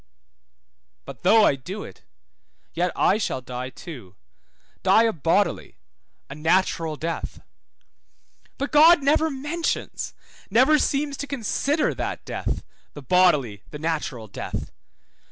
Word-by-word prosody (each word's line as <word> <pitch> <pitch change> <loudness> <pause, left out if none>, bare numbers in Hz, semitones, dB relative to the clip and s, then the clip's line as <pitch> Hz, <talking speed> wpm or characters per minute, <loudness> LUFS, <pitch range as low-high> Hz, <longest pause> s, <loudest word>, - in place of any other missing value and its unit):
But 140 -3 -10
though 215 +4 +6
I - - +4
do 180 +11 -7
it, 95 - -12 0.7
yet 175 +2 0
I 205 - +3
shall 200 - -1
die 125 0 -6
too, 125 - -11 0.7
die 225 - +5
a 225 -1 +2
bodily, 165 - 0 0.5
a - - -8
natural 160 +1 +1
death. 165 +2 -4 1.2
But 280 +1 -3
God 310 +1 +7
never 310 +3 +3
mentions, 300 +4 -3 0.3
never 260 +9 +5
seems 280 0 0
to 285 - -5
consider 280 +4 0
that - - -5
death, - - -3 0.3
the 145 - -9
bodily, 145 - +3
the 150 - -7
natural 150 -7 -3
death. 100 - -6
180 Hz, 120 wpm, -24 LUFS, -, 1.2 s, God